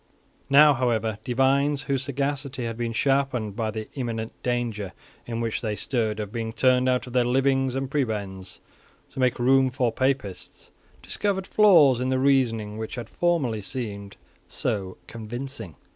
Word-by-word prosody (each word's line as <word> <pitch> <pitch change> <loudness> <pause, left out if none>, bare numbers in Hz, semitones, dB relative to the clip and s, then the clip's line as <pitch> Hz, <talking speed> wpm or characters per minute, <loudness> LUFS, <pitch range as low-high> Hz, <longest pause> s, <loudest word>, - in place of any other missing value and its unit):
Now, 145 +1 +7
however, 115 -4 0
divines, 135 +3 +2
whose 135 -3 -1
sagacity 140 -1 -3
had 115 -1 -3
been 120 0 -2
sharpened 125 -4 0
by 110 -1 -1
the 110 0 -5
imminent 115 -4 -4
danger 120 -5 -2 0.3
in 115 -1 -3
which 115 -1 -2
they 110 -3 -2
stood 110 0 -2
of 105 -1 -4
being 115 -1 -4
turned 130 +1 +3
out 125 0 +1
of 125 - -10
their 125 -1 +3
livings 135 +1 +1
and 135 0 -2
prebends 105 -9 -3 0.5
to - - -8
make 125 -2 +2
room 130 +2 +4
for 125 -2 0
Papists, 130 -7 -3 0.3
discovered 195 -2 -1
flaws 165 - +5
in 130 - 0
the 130 - +1
reasoning 115 -6 +1
which 110 - -5
had 120 -3 -7
formerly 145 -11 0
seemed 100 -2 -6 0.3
so 95 -3 -3
convincing. 115 - -7
125 Hz, 155 wpm, -25 LUFS, 110-135 Hz, 0.5 s, Now